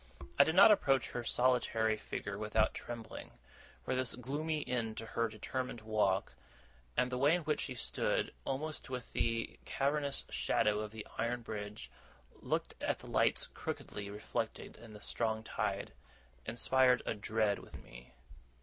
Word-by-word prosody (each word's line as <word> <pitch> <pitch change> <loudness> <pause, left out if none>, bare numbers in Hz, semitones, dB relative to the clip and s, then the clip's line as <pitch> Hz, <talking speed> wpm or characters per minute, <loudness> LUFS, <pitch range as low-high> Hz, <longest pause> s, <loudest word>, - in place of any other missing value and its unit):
I - - +11
did 160 - 0
not 200 +3 +10
approach 135 - +3
her 120 - -3
solitary 120 -3 +2
figure 100 -1 -5
without 110 +1 +2
trembling; 120 -2 -7 0.5
for - - 0
this 130 -2 0
gloomy 150 +5 -2
end 115 -3 -1
to 115 - -4
her 115 +1 0
determined 120 +3 -4
walk, 105 - +1 0.6
and 125 - +3
the 125 - -1
way 145 +5 +5
in 175 - -2
which 150 0 0
she 130 - -3
stood, 120 - -1
almost 150 +2 -3
within 125 -2 -5
the 115 -1 -1
cavernous 140 0 0
shadow 105 0 +2
of 105 0 -3
the 110 -1 -7
iron 120 +1 0
bridge, 105 -1 -6 0.5
looking - - -2
at - - +1
the - - -12
lights - - +3
crookedly 100 -1 -5
reflected 105 +1 -4
in 115 -2 -12
the 105 - -11
strong 110 0 -1
tide, - - -2 0.5
inspired 125 +2 +4
a - - 0
dread 105 0 +1
within - - -11
me. - - -13
115 Hz, 155 wpm, -35 LUFS, 110-130 Hz, 0.6 s, I